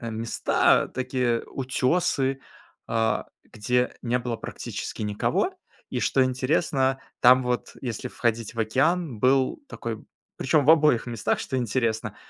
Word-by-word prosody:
места, 115 Hz, -1 st, +1 dB
такие 125 Hz, -2 st, -1 dB
утёсы, 135 Hz, 0 st, 0 dB, 0.5 s
а, 115 Hz, 0 st, 0 dB, 0.2 s
где 125 Hz, +4 st, -1 dB
не 125 Hz, 0 st, 0 dB
было 120 Hz, -1 st, -3 dB
практически 110 Hz, -, -6 dB
никого. 105 Hz, -1 st, 0 dB, 0.4 s
И -, -, -2 dB
что 135 Hz, -1 st, +3 dB
интересно, 135 Hz, 0 st, +1 dB, 0.2 s
там 130 Hz, +1 st, +7 dB
вот, 125 Hz, 0 st, -2 dB
если 120 Hz, -5 st, -4 dB
входить 115 Hz, -1 st, -2 dB
в 115 Hz, -, -10 dB
океан, 135 Hz, +4 st, +1 dB
был 130 Hz, -, +2 dB
такой -, -, -6 dB, 0.3 s
причём 155 Hz, -3 st, +2 dB
в 150 Hz, -, +6 dB
обоих 150 Hz, -7 st, +4 dB
местах, 115 Hz, -3 st, -1 dB
что 130 Hz, -, -3 dB
интересно, 115 Hz, -3 st, -1 dB
125 Hz, 125 wpm, -25 LUFS, 115-135 Hz, 0.5 s, там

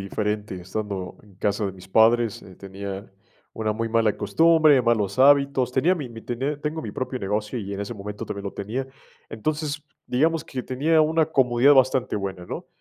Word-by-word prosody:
diferente, 105 Hz, +1 st, -3 dB
estando 95 Hz, 0 st, -5 dB
en 100 Hz, -3 st, -20 dB
casa 100 Hz, +1 st, -1 dB
de 95 Hz, -, -4 dB
mis 95 Hz, -1 st, -14 dB
padres, 115 Hz, +2 st, +3 dB
eh, 95 Hz, -, -13 dB
tenían 100 Hz, +1 st, -7 dB, 0.4 s
una 110 Hz, -1 st, -1 dB
muy 115 Hz, +1 st, -3 dB
mala 115 Hz, -2 st, +2 dB
costumbre, 155 Hz, +5 st, +4 dB
malos 110 Hz, -3 st, +1 dB
hábitos, 140 Hz, -2 st, +4 dB
tenía 160 Hz, +8 st, +3 dB
mi 145 Hz, -8 st, -5 dB
mi 115 Hz, -1 st, -10 dB
tenía 135 Hz, +5 st, -3 dB
tengo 155 Hz, +1 st, -3 dB
mi 110 Hz, -, -5 dB
propio 130 Hz, +4 st, -4 dB
negocio, 105 Hz, +3 st, -2 dB
y 100 Hz, -2 st, -5 dB
en 100 Hz, -, -4 dB
ese 100 Hz, +4 st, -5 dB
momento 105 Hz, 0 st, -7 dB
también 100 Hz, -, -5 dB
lo 100 Hz, -, -4 dB
tenía. 120 Hz, +7 st, -4 dB, 0.4 s
Entonces, 150 Hz, +5 st, -3 dB, 0.2 s
digamos 160 Hz, +6 st, +1 dB
que 130 Hz, -2 st, -5 dB
tenía 155 Hz, +5 st, +2 dB
una 160 Hz, +1 st, +3 dB
comodidad 135 Hz, -2 st, +4 dB
bastante 130 Hz, -2 st, +2 dB
buena, 95 Hz, -3 st, -5 dB
¿no? -, -, -6 dB
115 Hz, 185 wpm, -24 LUFS, 100-140 Hz, 0.4 s, costumbre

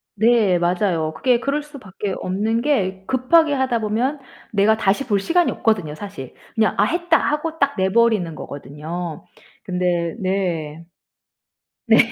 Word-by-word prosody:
네. 215 Hz, -4 st, +3 dB
맞아요. 175 Hz, -2 st, 0 dB
그게 245 Hz, +5 st, +2 dB
그럴 280 Hz, +4 st, -1 dB
수밖에 210 Hz, -, -6 dB
없는 215 Hz, +5 st, -1 dB
게 195 Hz, -9 st, 0 dB
급하게 290 Hz, +5 st, +3 dB
하다 260 Hz, -3 st, +1 dB
보면 230 Hz, +7 st, -1 dB, 0.3 s
내가 215 Hz, +1 st, +3 dB
다시 210 Hz, +5 st, +1 dB
볼 205 Hz, -4 st, +2 dB
시간이 335 Hz, -, +2 dB
없거든요. 185 Hz, -10 st, 0 dB
사실. 195 Hz, -8 st, -9 dB, 0.2 s
그냥 220 Hz, -1 st, +2 dB
'아 -, -, +4 dB
했다.' 345 Hz, 0 st, +2 dB
하고 310 Hz, +2 st, -2 dB
딱 280 Hz, 0 st, +2 dB
내 190 Hz, 0 st, +1 dB
버리는 215 Hz, -7 st, +2 dB
거거든요. 155 Hz, +4 st, -7 dB, 0.4 s
근데 180 Hz, -2 st, -1 dB
네. 170 Hz, -5 st, -2 dB, 1.0 s
네. 225 Hz, -2 st, +5 dB
205 Hz, 270 characters per minute, -21 LUFS, 180-255 Hz, 1.0 s, 네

